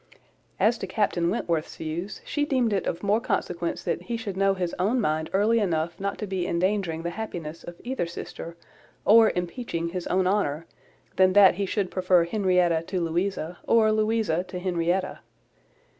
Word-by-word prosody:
As 220 +4 +3
to 195 - -4
Captain 180 -4 0
Wentworth's 165 -3 -2
views, 165 +5 -5
she 295 - -1
deemed 255 -6 +1
it 195 - -1
of 170 - -3
more 205 +3 +2
consequence 175 -5 -2
that - - -1
he 235 -1 -4
should 205 -4 -5
know 195 0 +2
his 180 -2 -2
own 215 +8 +2
mind 160 -6 0
early 215 +4 +3
enough 170 -4 -1
not 200 +1 -2
to 210 - -4
be 190 -3 -2
endangering 175 -2 0
the 170 - -2
happiness 170 -7 -6
of 175 0 -10
either 245 -8 -2
sister, 170 0 -8 0.5
or 225 +1 +7
impeaching 175 -1 -3
his 180 0 -4
own 185 0 +1
honour, 170 -5 0 0.5
than 185 0 +5
that 200 -1 +7
he 195 +2 -2
should 195 -1 -1
prefer 180 -2 +3
Henrietta 180 -4 +2
to 185 - -2
Louisa, 175 0 -2
or 220 -2 +4
Louisa 215 -5 +1
to 185 0 -7
Henrietta. 180 0 -1
185 Hz, 175 wpm, -26 LUFS, 170-210 Hz, 0.5 s, or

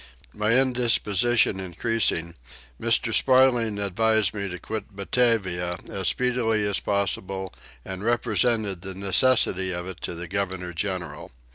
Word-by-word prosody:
My 105 +1 0
indisposition 120 -4 +2
increasing, 90 -2 -1 0.5
Mr. 115 0 +2
Sparling 125 -5 +3
advised 110 +1 +1
me 100 -2 -4
to 90 - -6
quit 110 +1 -7
Batavia 95 -5 0
as 95 -2 -2
speedily 120 -4 +1
as 100 - 0
possible 95 -1 -2 0.3
and 95 +1 -6
represented 110 -4 0
the 95 0 -7
necessity 95 -1 +2
of 90 0 -4
it 95 0 -8
to - - -4
the 85 +1 -7
governor 95 -2 -3
general. 90 +1 -4
100 Hz, 125 wpm, -25 LUFS, 95-115 Hz, 0.5 s, Sparling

